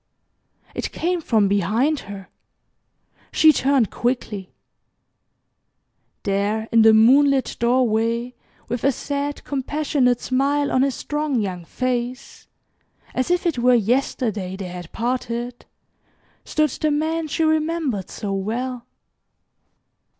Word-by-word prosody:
It - - -4
came 350 +1 -1
from 220 -8 +2
behind 220 - +1
her. 195 -2 -8 1.0
She 315 -1 +6
turned 265 -6 +2
quickly. 225 -6 -2 1.7
There 205 +2 0
in 230 -1 +5
the 220 0 +7
moonlit 265 +4 +4
doorway, 235 0 +1 0.3
with 240 0 -3
a 275 - +4
sad, 285 +2 -4
compassionate 275 -3 0
smile 280 +2 0
on 255 - +3
his 270 -2 +1
strong, 295 -3 -2
young 185 -5 -3
face 250 +3 -4 0.7
as 255 - -1
if 355 +1 +1
it 330 -8 0
were 250 +1 +5
yesterday 220 -4 0
they 190 -2 -6
had 175 -2 -8
parted 240 0 -3 0.8
stood 305 -2 +1
the 310 - -1
man 315 +2 -1
she 320 +2 -1
remembered 315 - 0
so 205 -3 -4
well. 235 +5 -3
250 Hz, 115 wpm, -22 LUFS, 220-285 Hz, 1.7 s, the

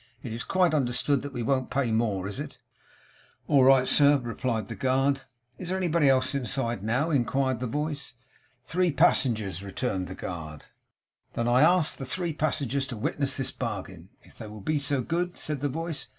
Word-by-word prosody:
It's 115 0 -4
quite 180 -3 +2
understood 135 0 +1
that 145 - -6
we 120 -3 -4
won't 130 +1 0
pay 125 -2 0
more. 105 -4 0
Is 100 - -6
it?' - - -7 0.9
'All 140 -3 +5
right, 130 -1 +6
sir,' 145 0 +5
replied 120 -3 -3
the - - -5
guard. 135 +1 +1 0.4
'Is 180 - -5
there 190 - 0
anybody 170 -5 +2
inside 130 -3 0
now?' 125 +9 0
inquired 130 -1 +1
the 125 - -2
voice. 145 -1 -3 0.5
'Three 180 +4 +1
passengers,' 115 - +2
returned 100 -1 -3
the 95 - -7
guard. 80 -6 -7 0.7
'Then 115 - -1
I 120 +2 +4
ask 170 0 +4
the 135 - -6
three 175 +2 -2
passengers 140 -3 -1
to 120 - -6
witness 135 +5 -1
this 135 -1 -1
bargain, 95 -3 -6
if - - -19
they 110 - -7
will 105 0 -9
be 150 +8 0
so 140 -2 0
good,' 175 +5 -2
said 150 -2 -2
the 145 - 0
voice. 165 +2 -4
130 Hz, 180 wpm, -27 LUFS, 115-145 Hz, 0.9 s, right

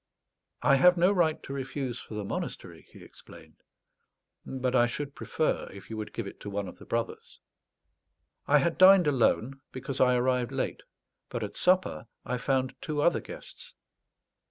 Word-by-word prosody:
"I 140 - +5
have 180 +5 +6
no 180 +3 +4
right 170 -5 +1
to 140 - -7
refuse 135 -2 -4
for 110 - -9
the 105 -1 -4
monastery," - - -6
he - - -14
explained, - - -15 0.8
"but 130 -1 -2
I 120 -1 +5
should 140 +4 -5
prefer 155 - -1
if 100 +3 -12
you 110 - -4
would 105 -1 -5
give 115 - -5
it 100 - -9
to 105 - -7
one 100 -1 -3
of 90 - -11
the - - -12
brothers." 115 0 -4 1.1
I 145 - +6
had 165 +4 0
dined 185 -1 +8
alone, 135 -1 +1
because 130 +1 -4
I 125 -1 +5
arrived 125 -1 +1
late; - - -3 0.5
but - - -4
at - - -6
supper 185 -9 +2 0.2
I 125 0 -2
found 130 0 0
two 150 -2 -3
other 170 +4 +3
guests. - - -10
130 Hz, 170 wpm, -29 LUFS, 120-155 Hz, 1.1 s, dined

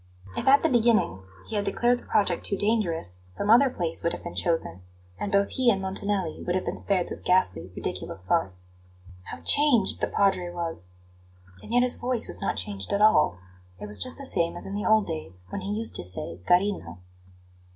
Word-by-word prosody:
If 250 - -4
at 275 +1 +6
the - - +4
beginning 230 - +2 0.3
he - - -6
had 205 - 0
declared 240 +5 +1
the - - -17
project 200 -5 +1
too 200 - -2
dangerous, 175 - -1
some 200 - -1
other 265 +4 +6
place 170 -8 -3
would 170 - -1
have - - -8
been 175 - -7
chosen; 160 - -1 0.4
and 205 - -3
both 200 -1 +2
he 255 -2 +2
and 200 -4 +2
Montanelli 190 -2 0
would 175 - -1
have 185 - -1
been - - -3
spared 185 -3 +3
this - - -3
ghastly, 95 - +1
ridiculous 95 - -4
farce. 90 0 -1 0.6
How - - -9
changed 280 -9 +4
the - - +1
Padre 195 -3 +1
was! 165 - -4 0.7
And - - -11
yet 245 +1 +4
his 250 - +4
voice 245 -1 +1
was - - +1
not - - -1
changed 95 +1 -4
at 200 - 0
all; 215 - +4 0.4
it - - -6
was 105 0 -5
just 255 - -2
the 275 - -7
same 170 -8 -1
as - - -8
in 195 - -6
the 205 - -2
old 220 -1 +4
days, 95 - -7
when 200 - -5
he 195 - -6
used 225 +2 -2
to - - -5
say: 90 -1 -5
"Carino." 180 - +1
190 Hz, 205 wpm, -26 LUFS, 155-220 Hz, 0.7 s, at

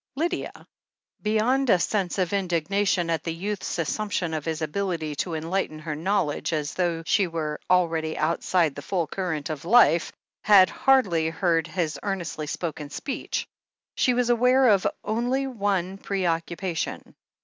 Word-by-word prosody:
Lydia, 345 +5 -3 0.6
beyond 235 +5 +1
a 185 - +6
sense 190 0 -1
of 185 0 0
indignation 185 0 +1
at 165 - 0
the 165 - -2
youth's 200 +3 -3
assumption 175 0 -2
of 155 -2 -3
his 160 -1 -2
ability 160 -2 -2
to 165 +3 -3
enlighten 165 0 -2
her 155 0 -5
knowledge 160 -2 -1
as 150 -2 -2
though 170 -3 -1
she 195 +2 +2
were 155 -3 -3
already 165 -3 +1
outside 165 0 +1
the 145 - -8
full 175 +3 -1
current 160 -3 -3
of 150 -2 -6
life, 175 -4 +5 0.3
hardly 195 -3 +4
heard 165 -1 +1
his 165 -4 -2
earnestly 175 -6 -3
spoken 155 -2 -4
speech. 270 - -4 0.5
She 250 - +2
was 245 -1 +2
aware 250 +2 +4
of 200 -3 +4 0.2
only 245 +5 0
one 195 -6 -1
preoccupation. 175 -2 -2
180 Hz, 140 wpm, -25 LUFS, 160-205 Hz, 0.6 s, a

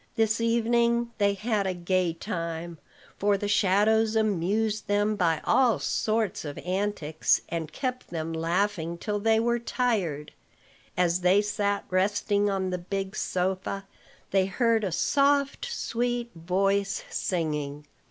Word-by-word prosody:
This 225 0 +1
evening 235 +1 +2
they 200 -1 +3
had 210 -1 -1
a 185 - -1
gay 180 0 +1
time; 170 -2 -5 0.4
for 200 0 +2
the 205 - -3
shadows 215 +2 +3
amused 215 +1 0
them 205 +1 +1
by 165 -5 +1
all 250 -4 +3
sorts 220 -2 -1
of 145 -2 -6
antics, 180 -4 0
and 160 -2 -3
kept 255 - -4
them 165 -1 -4
laughing 170 +1 -1
till 205 +3 -2
they 220 +1 +3
were 235 +1 +1
tired. 200 - -1 0.7
As 180 0 +2
they 180 +3 +5
sat 205 -1 -1
resting 205 +2 +1
on 190 -1 -1
the 180 - -2
big 195 +2 -4
sofa, 190 +2 -2 0.5
they 190 -1 +3
heard 225 +2 +1
a 190 - -1
soft, 280 - +2
sweet 240 - -2
voice 195 +4 0
singing. 150 -4 -2
200 Hz, 135 wpm, -27 LUFS, 175-220 Hz, 0.7 s, they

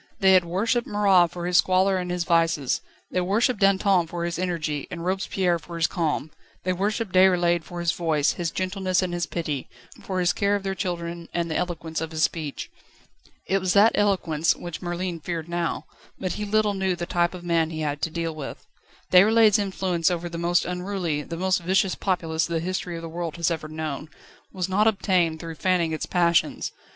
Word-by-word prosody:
They 190 -2 +5
had 185 -2 +5
worshipped 225 +8 0
Marat 195 -4 +4
for 175 0 -6
his 180 0 +3
squalor 190 +1 +3
and 180 -1 -3
his 180 -1 -1
vices; 165 -6 +1 0.3
they 185 - +1
worshipped 210 +5 +1
Danton 195 -3 +3
for 170 +1 -4
his 170 0 -3
energy 160 -5 -2
and 170 -1 -6
Robespierre 185 -2 0
for 170 +2 -10
his 165 -1 +2
calm; 155 -2 -1 0.3
they 185 - 0
worshipped 205 +2 -2
Déroulède 175 -2 +4
for 175 +2 -8
his 170 -1 +1
voice, 160 -5 +1
his 175 -2 -2
gentleness 185 0 -1
and 180 -1 -3
his 175 0 -2
pity, 150 -6 -3 0.3
for 185 -1 -3
his 180 -1 +2
care 200 -1 +1
of 200 - -3
their 195 -1 -1
children 170 -3 -4
and 170 -1 -1
the - - -2
eloquence 165 -3 -3
of 160 - -3
his 160 -1 -1
speech. 150 -2 -2 0.7
It 195 - +1
was 185 -1 0
that 210 +3 +6
eloquence 175 -6 +2
which 175 -2 -7
Merlin 175 -1 -3
feared 165 0 -4
now; 170 -1 -2 0.3
but 185 - -3
he 210 - -4
little 210 0 +2
knew 190 -2 0
the 175 0 -4
type 175 +1 0
of 175 - -9
man 165 -2 +1
he 160 -1 -5
had 145 -1 -2
to - - 0
deal 165 0 -3
with. 150 -3 -8 0.5
Déroulède's 215 +3 +6
influence 190 -4 0
over 175 -1 -2
the 170 -1 -6
most 175 +1 +2
unruly, 180 -4 -2
the 165 +3 -7
most 185 0 +1
vicious 190 +2 +2
populace 165 -4 -1
the 170 -1 -1
history 180 0 -3
of 165 - -7
the - - -5
world 165 -1 -4
has 170 -1 0
ever 160 -2 -3
known, 155 -1 -5 0.4
was 185 -1 -2
not 205 +3 +2
obtained 180 -6 +1
through 165 0 -6
fanning 170 0 +1
its 155 - -3
passions. 170 -2 +1
175 Hz, 200 wpm, -25 LUFS, 165-190 Hz, 0.7 s, that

